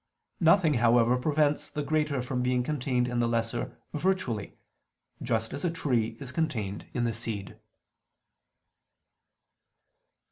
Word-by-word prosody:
Nothing, 165 -2 +5
however, 120 0 +4
prevents 150 +2 +1
the 150 - -3
greater 150 -3 0
from 125 0 -2
being 125 0 +1
contained 125 -3 0
in 120 -1 -1
the 120 - +2
lesser 115 -1 -2 0.2
virtually; 150 - -1 0.6
just 115 -2 -1
as - - -5
a 175 - +2
tree 120 -9 0
is 135 -2 -7
contained 115 -10 -2
in 120 - +1
the 115 -1 0
seed. 110 -4 -5
125 Hz, 120 wpm, -28 LUFS, 115-150 Hz, 0.6 s, Nothing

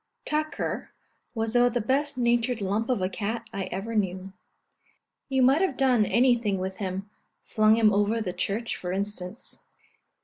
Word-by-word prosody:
Tucker 310 +1 -2 0.5
was 225 +1 -2
about 245 0 +4
the - - +3
best 275 +5 0
natured 240 0 +1
lump 205 +4 -1
of 235 -7 +1
a - - +2
cat 220 +4 -4
I 195 -1 -3
ever 195 +5 -5
knew. 190 -2 -2 1.0
You 265 -1 +2
might 270 +6 +5
have 370 -9 0
done 250 -6 +3
anything 235 -3 +3
with 190 +1 -4
him 190 0 -4 0.4
flung 215 0 +4
him 220 -2 +4
over 205 +3 +2
the 185 -5 -3
church 200 +5 -2
for 180 - -5
instance. 195 +1 -5
220 Hz, 160 wpm, -26 LUFS, 195-245 Hz, 1.0 s, might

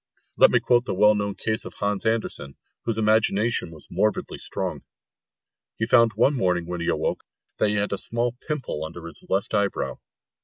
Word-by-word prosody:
Let - - +7
me - - +3
quote 120 0 +2
the - - -2
well 105 +2 +6
known 100 -1 -2
case 110 -1 0
of - - -9
Hans 100 +1 0
Andersen, 110 -11 -2 0.3
whose 115 -2 0
imagination 110 -1 +2
was 80 -3 -10
morbidly 105 -1 -1
strong. - - -3 1.0
He 110 - 0
found 115 -1 +4
one 120 +7 +3
morning 90 -8 0
when 90 0 -5
he 85 - -3
awoke - - -1 0.4
that - - +3
he 105 - 0
had 105 0 0
a 100 - -1
small 120 +1 0
pimple 135 - -3
under 80 +1 -8
his 85 - -10
left 95 +3 -1
eyebrow. 100 -1 -1
105 Hz, 185 wpm, -24 LUFS, 95-115 Hz, 1.0 s, Let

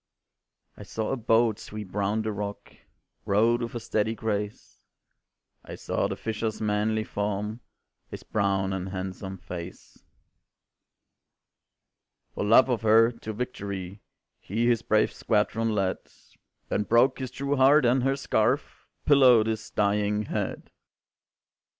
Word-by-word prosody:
I - - -11
saw 110 -1 -4
a - - +1
boat 115 -2 +2
sweep 105 -4 -8
round 105 +2 0
the 110 - -2
rock, 100 0 -6 0.5
Rowed 115 +4 +2
with 120 0 -5
a - - -2
steady 110 0 -1
grace; 105 -2 -4 0.8
I - - -8
saw - - -1
the - - -4
fisher's 110 0 -3
manly 110 +1 0
form, 105 +2 -3 0.5
His - - -8
brown 95 -2 0
and 95 0 -4
handsome 95 0 -6
face. 90 0 -9 2.3
"For - - -3
love 115 +6 +6
of 125 -3 -1
her, 115 +1 +5
to 115 -2 -8
victory 100 -4 -5 0.4
He 110 +5 -2
his 120 -2 +2
brave 110 -2 +2
squadron 110 +1 0
led, 95 -2 0 0.7
Then - - 0
broke 120 +6 +3
his 130 -1 -4
true 140 +2 -2
heart, 135 +2 +5
and 125 +2 +3
her 135 +2 +1
scarf 130 0 -1 0.2
Pillowed 130 -6 +6
his 110 0 -3
dying 105 0 +1
head. - - -4
110 Hz, 130 wpm, -27 LUFS, 100-120 Hz, 2.3 s, love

